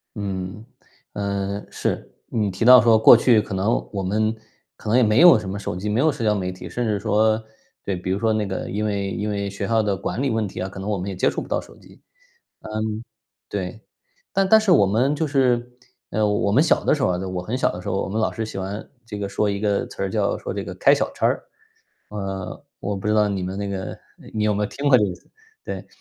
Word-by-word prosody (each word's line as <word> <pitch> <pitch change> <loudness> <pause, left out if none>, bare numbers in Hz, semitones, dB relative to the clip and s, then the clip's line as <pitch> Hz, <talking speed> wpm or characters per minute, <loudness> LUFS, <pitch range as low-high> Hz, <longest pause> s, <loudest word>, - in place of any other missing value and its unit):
嗯， 100 0 -5 0.5
呃， 100 0 -3
是。 - - -3 0.2
你 105 -3 0
提 95 +5 -2
到 125 +1 +10
说 110 0 +5
过 110 - +9
去 115 -1 +4
可 105 - -4
能 95 +5 0
我 100 -1 -2
们 110 +4 0 0.4
可 110 - -7
能 115 - +4
也 125 - +5
没 110 +4 +4
有 175 -9 +9
什 100 -3 -6
么 100 - -4
手 100 - -4
机， 100 +3 -4
没 105 +3 +1
有 155 +1 +4
社 120 - -5
交 105 -1 +3
媒 90 -2 -2
体。 90 - -9
甚 120 - -2
至 105 -2 0
说 110 +1 +2 0.4
对， 100 - -1
比 90 +1 -4
如 95 - 0
说 110 0 +2
那 110 -1 0
个 95 -1 -4
因 105 +2 -2
为 100 -2 -1
因 105 +2 -2
为 100 -1 -2
学 100 +1 -4
校 115 +1 +2
的 105 -2 0
管 100 +5 -3
理 140 - +1
问 110 -2 0
题 95 - -7
啊， 90 - -2
可 95 - -11
能 100 +2 -4
我 105 - 0
们 95 +2 -4
也 95 - -5
接 90 - +2
触 - - -3
不 - - -8
到 - - -1
手 - - -16
机， - - -19 0.6
嗯， 110 0 -3 0.5
对。 100 +1 -4 0.5
但 195 -1 +2
但 220 - +8
是 215 -3 +1
我 140 - +6
们 120 +9 +2
就 160 +2 0
是 125 -4 +1 0.3
呃， 105 0 +1
我 105 -1 +1
们 125 +8 +5
小 165 - +3
的 - - +3
时 150 - -1
候 130 - +3
啊， 90 - 0
我 90 -1 -3
很 110 +8 -3
小 - - +1
的 90 - -7
时 - - -9
候， 95 - 0
我 - - -4
们 105 +3 -2
老 110 - +2
师 110 - -4
喜 110 - -7
欢 95 +2 -5 0.2
这 105 -3 -7
个 100 -1 -3
说 105 +1 0
一 100 0 -2
个 105 -2 +1
词 - - -5
儿， - - -1
叫 - - 0
说 - - -5
这 - - -3
个 - - -7
“开 - - +5
小 - - 0
差 - - -1
儿”。 - - +1 0.7
呃， 95 -2 -5 0.2
我 105 - -2
不 95 - -5
知 105 - +2
道 105 -1 +3
你 100 -2 -2
们 95 +2 -4
那 100 0 -3
个 95 -1 -5 0.4
你 110 - -1
有 105 0 +2
没 105 - -1
有 - - +2
听 145 +1 -1
过 130 - +7
这 105 - +3
个 95 - -3
词， - - -18 0.3
对。 - - -6
105 Hz, 285 characters per minute, -23 LUFS, 100-110 Hz, 0.7 s, 到